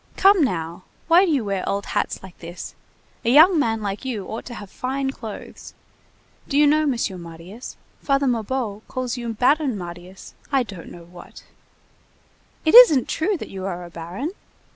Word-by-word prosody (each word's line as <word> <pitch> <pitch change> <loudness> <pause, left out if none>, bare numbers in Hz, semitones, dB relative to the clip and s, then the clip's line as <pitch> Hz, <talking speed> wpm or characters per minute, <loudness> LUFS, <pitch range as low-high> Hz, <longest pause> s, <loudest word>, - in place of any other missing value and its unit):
Come 390 -3 +6
now! 170 - -2 0.3
Why 345 +3 +6
do 345 - 0
you 270 -7 +1
wear 195 -2 -2
old 200 0 -2
hats - - -2
like 190 -2 -12
this! 170 +1 -8 0.5
A 230 - +1
young 315 +6 +7
man 225 -5 0
like 200 +3 -4
you 230 -7 -4
ought 220 - -6
to 240 - -8
have 205 -3 -10
fine 265 +1 -2
clothes. 225 -5 -10 0.7
Do 280 - -1
you 295 - +6
know, 305 +1 +3
Monsieur 230 -8 -1
Marius, 170 +7 -10 0.2
Father 275 0 +1
Mabeuf 230 -3 -2
calls 255 -1 -3
you 240 -2 -4
Baron 260 +1 +2
Marius, 175 +1 -10 0.2
I 270 -2 +3
don't 195 -6 -10
know 170 - -11
what. 175 +1 -14 1.2
It 315 - +3
isn't 390 - +8
true 375 +5 0
that - - -8
you 190 -1 -6
are 175 -2 -5
a 175 - -12
baron? 175 - -5
230 Hz, 175 wpm, -22 LUFS, 190-280 Hz, 1.2 s, isn't